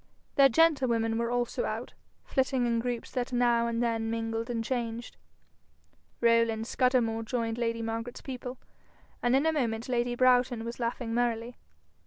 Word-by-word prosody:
Their 275 Hz, -1 st, +6 dB
gentlewomen 240 Hz, -7 st, +2 dB
were 235 Hz, 0 st, 0 dB
also 245 Hz, 0 st, -1 dB
out, -, -, -4 dB, 0.3 s
flitting 265 Hz, -2 st, +1 dB
in 235 Hz, -1 st, +1 dB
groups 240 Hz, 0 st, -3 dB
that 250 Hz, -1 st, -2 dB
now 240 Hz, -1 st, +2 dB
and 235 Hz, 0 st, -1 dB
then 225 Hz, -1 st, 0 dB
mingled 225 Hz, +1 st, -2 dB
and 230 Hz, -2 st, -1 dB
changed. 235 Hz, -1 st, -3 dB, 1.1 s
Rowland 230 Hz, -1 st, +3 dB
Scudamore 240 Hz, -2 st, +1 dB
joined 230 Hz, 0 st, -2 dB
lady 230 Hz, -1 st, -1 dB
Margaret's 225 Hz, +2 st, -4 dB
people, 255 Hz, -1 st, -6 dB, 0.6 s
and 245 Hz, +1 st, +3 dB
in 275 Hz, +3 st, +3 dB
a 320 Hz, -, +3 dB
moment 230 Hz, -6 st, -1 dB
lady 240 Hz, -1 st, 0 dB
Broughton 245 Hz, -2 st, +3 dB
was 235 Hz, +1 st, -6 dB
laughing 235 Hz, -1 st, -2 dB
merrily. 240 Hz, 0 st, -1 dB
235 Hz, 150 wpm, -29 LUFS, 230-250 Hz, 1.1 s, Their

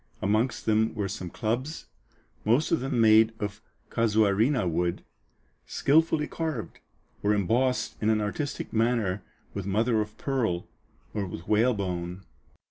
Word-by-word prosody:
Amongst 110 Hz, +5 st, 0 dB
them 110 Hz, +1 st, +2 dB
were 105 Hz, -3 st, -1 dB
some 90 Hz, -2 st, -5 dB
clubs, 120 Hz, -, -3 dB, 0.6 s
most 120 Hz, +8 st, +2 dB
of 165 Hz, -, +3 dB
them 130 Hz, -1 st, -1 dB
made 110 Hz, 0 st, +6 dB
of 105 Hz, 0 st, -4 dB, 0.3 s
casuarina 110 Hz, +1 st, +2 dB
wood, 85 Hz, +1 st, -1 dB, 0.6 s
skilfully 155 Hz, +1 st, +3 dB
carved, 155 Hz, -8 st, -4 dB, 0.4 s
or 105 Hz, +1 st, +2 dB
embossed 120 Hz, +6 st, 0 dB
in 110 Hz, -, +2 dB
an 110 Hz, -1 st, +3 dB
artistic 120 Hz, +8 st, -3 dB
manner 110 Hz, -4 st, +1 dB, 0.3 s
with 100 Hz, -1 st, -4 dB
mother 110 Hz, +3 st, +2 dB
of 105 Hz, 0 st, -6 dB
pearl 115 Hz, -11 st, -1 dB, 0.5 s
or 100 Hz, -2 st, -2 dB
with 90 Hz, -1 st, -8 dB
whalebone. 95 Hz, -5 st, 0 dB
110 Hz, 125 wpm, -27 LUFS, 100-125 Hz, 0.6 s, made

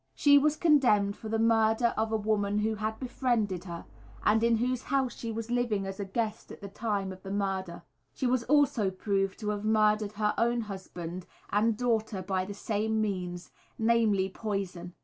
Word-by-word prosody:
She 285 Hz, -1 st, +6 dB
was 300 Hz, +1 st, +2 dB
condemned 245 Hz, -12 st, +3 dB
for 220 Hz, -, -8 dB
the 225 Hz, -, 0 dB
murder 225 Hz, +1 st, +3 dB
of 220 Hz, 0 st, -1 dB
a 220 Hz, -, +2 dB
woman 205 Hz, -1 st, 0 dB
who 215 Hz, +1 st, +1 dB
had 215 Hz, +1 st, -3 dB
befriended 240 Hz, -8 st, -1 dB
her, 170 Hz, -2 st, -7 dB, 0.4 s
and 220 Hz, +1 st, +4 dB
in 235 Hz, 0 st, +4 dB
whose 250 Hz, +2 st, 0 dB
house 265 Hz, -3 st, -1 dB
she 230 Hz, -, -5 dB
was 225 Hz, +1 st, -5 dB
living 235 Hz, -5 st, 0 dB
as 195 Hz, +1 st, -6 dB
a 200 Hz, -, -2 dB
guest 215 Hz, +2 st, -3 dB
at -, -, -10 dB
the 200 Hz, -, -8 dB
time 200 Hz, -2 st, -2 dB
of 185 Hz, 0 st, -10 dB
the 195 Hz, -, -8 dB
murder. 195 Hz, -3 st, -2 dB, 0.3 s
She -, -, -2 dB
was 250 Hz, -1 st, +2 dB
also 275 Hz, -8 st, +3 dB
proved 195 Hz, 0 st, -1 dB
to 210 Hz, -, -2 dB
have 205 Hz, -1 st, -2 dB
murdered 215 Hz, -1 st, +2 dB
her 210 Hz, 0 st, 0 dB
own 235 Hz, +1 st, +2 dB
husband 185 Hz, -4 st, -7 dB, 0.2 s
and 215 Hz, +1 st, +2 dB
daughter 220 Hz, -5 st, 0 dB
by 185 Hz, 0 st, -1 dB
the 200 Hz, +1 st, -7 dB
same 220 Hz, +1 st, -1 dB
means, 180 Hz, -4 st, -3 dB, 0.3 s
namely, 220 Hz, -4 st, +2 dB
poison. 190 Hz, -4 st, -4 dB
215 Hz, 190 wpm, -29 LUFS, 195-230 Hz, 0.4 s, She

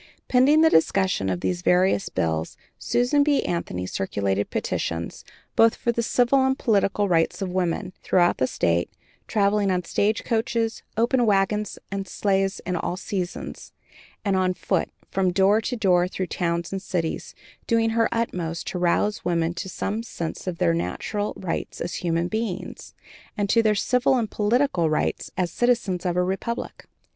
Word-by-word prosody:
Pending 275 Hz, +5 st, +5 dB
the 320 Hz, -, +6 dB
discussion 185 Hz, -, +2 dB
of 90 Hz, -1 st, -2 dB
these 180 Hz, -1 st, -1 dB
various 185 Hz, +2 st, +2 dB
bills, 80 Hz, -2 st, -2 dB, 0.2 s
Susan 250 Hz, +4 st, +2 dB
B. 290 Hz, -1 st, +2 dB
Anthony 90 Hz, -, -3 dB
circulated 100 Hz, +1 st, -1 dB
petitions, 85 Hz, 0 st, -3 dB, 0.3 s
both 225 Hz, 0 st, +5 dB
for 235 Hz, -, 0 dB
the 235 Hz, -, -1 dB
civil 250 Hz, +3 st, +3 dB
and 265 Hz, 0 st, +1 dB
political 205 Hz, -2 st, +1 dB
rights 165 Hz, -3 st, +1 dB
of 190 Hz, -2 st, -3 dB
women, 180 Hz, 0 st, -1 dB
throughout 175 Hz, -2 st, +2 dB
the 130 Hz, -, +2 dB
State, 85 Hz, -5 st, 0 dB, 0.4 s
traveling 205 Hz, -1 st, +2 dB
in 180 Hz, -1 st, 0 dB
stage 215 Hz, +5 st, 0 dB
coaches, 230 Hz, 0 st, -1 dB, 0.2 s
open 240 Hz, +2 st, +3 dB
wagons, 205 Hz, +1 st, +1 dB
and 195 Hz, -1 st, -3 dB
sleighs 195 Hz, 0 st, 0 dB
in 180 Hz, -, -3 dB
all 175 Hz, +1 st, -2 dB
seasons, 185 Hz, -2 st, -5 dB, 0.5 s
and 200 Hz, -1 st, +2 dB
on 185 Hz, -1 st, +1 dB
foot, -, -, -1 dB, 0.2 s
from 190 Hz, -1 st, +1 dB
door 195 Hz, +4 st, +4 dB
to 245 Hz, -, -2 dB
door 180 Hz, -5 st, +3 dB
through 185 Hz, 0 st, -3 dB
towns 170 Hz, -1 st, -2 dB
and 195 Hz, -1 st, -3 dB
cities, 175 Hz, -4 st, -3 dB, 0.3 s
doing 225 Hz, -1 st, +2 dB
her 230 Hz, 0 st, +2 dB
uttermost 180 Hz, -8 st, -2 dB
to 180 Hz, -, -4 dB
rouse 180 Hz, +4 st, +1 dB
women 170 Hz, -1 st, 0 dB
to 180 Hz, +2 st, -5 dB
some 205 Hz, +4 st, -3 dB
sense 170 Hz, -6 st, -6 dB
of 180 Hz, -2 st, -2 dB
their 175 Hz, -1 st, +2 dB
natural 205 Hz, +5 st, -2 dB
rights 180 Hz, -3 st, -4 dB
as 170 Hz, -1 st, -4 dB
human 170 Hz, 0 st, -1 dB
beings, 220 Hz, -2 st, -4 dB, 0.4 s
and 205 Hz, -1 st, 0 dB
to 230 Hz, -, +5 dB
their 215 Hz, -1 st, +2 dB
civil 250 Hz, +5 st, +2 dB
and 230 Hz, -4 st, -1 dB
political 210 Hz, -, +1 dB
rights 155 Hz, -, -1 dB
as 180 Hz, -2 st, 0 dB
citizens 220 Hz, -7 st, +1 dB
of 175 Hz, 0 st, -1 dB
a 180 Hz, -, +3 dB
republic. 195 Hz, +6 st, -4 dB
190 Hz, 165 wpm, -24 LUFS, 175-225 Hz, 0.5 s, the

